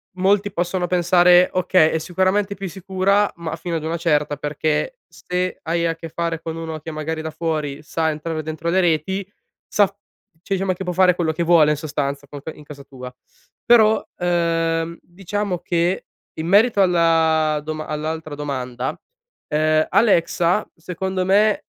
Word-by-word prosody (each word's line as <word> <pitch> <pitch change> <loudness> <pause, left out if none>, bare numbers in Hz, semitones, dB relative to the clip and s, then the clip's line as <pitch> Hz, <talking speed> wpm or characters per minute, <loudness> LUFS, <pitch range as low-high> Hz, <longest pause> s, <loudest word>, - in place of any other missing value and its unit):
molti 200 +2 +2
possono 180 0 -1
pensare 175 0 +5
okay, 185 -3 +3
è - - 0
sicuramente 190 +4 0
più 195 -2 -6
sicura 195 +2 +1
ma 160 -2 -4
fino 170 0 -3
ad 155 - -6
una 165 +2 -2
certa, 150 -3 +1
perché 150 - -2
se 180 0 -3
hai 170 +1 0
a 165 - -1
che 165 0 -9
fare 165 0 -3
con 160 0 -5
uno 160 -1 -5
che 160 +2 -7
magari 155 +1 -4
da 160 0 -5
fuori 155 -3 -3
sa 160 +1 -1
entrare 155 +1 -4
dentro 160 +2 -4
le 185 +3 +2
reti 185 +4 -1 0.4
sa 205 -2 +3
f 195 - -20 0.5
cioè, 195 -1 -1
diciamo 185 0 0
che 185 - -6
può 180 -1 -3
fare 180 0 +4
quello 170 -3 0
che 160 +2 -4
vuole 165 -3 +5
in 150 - 0
sostanza 140 -2 -3
con 140 0 -9
que 160 - -6
in 150 - -14
casa 145 -1 -11
tua, 125 -2 -10 0.5
però, 220 -2 +5
uhm, 165 -1 0
diciamo 195 +1 -4
che, 175 +1 -1 0.3
in 160 - -5
merito 205 +3 +4
alla 160 -4 +3
doma 155 0 -5
all'altra 155 0 -4
domanda, 130 -3 -4 0.6
uhm, 155 +1 +2
Alexa, 185 -2 +2
secondo 185 +2 -3
me, 205 +3 +3
170 Hz, 170 wpm, -21 LUFS, 155-185 Hz, 0.6 s, pensare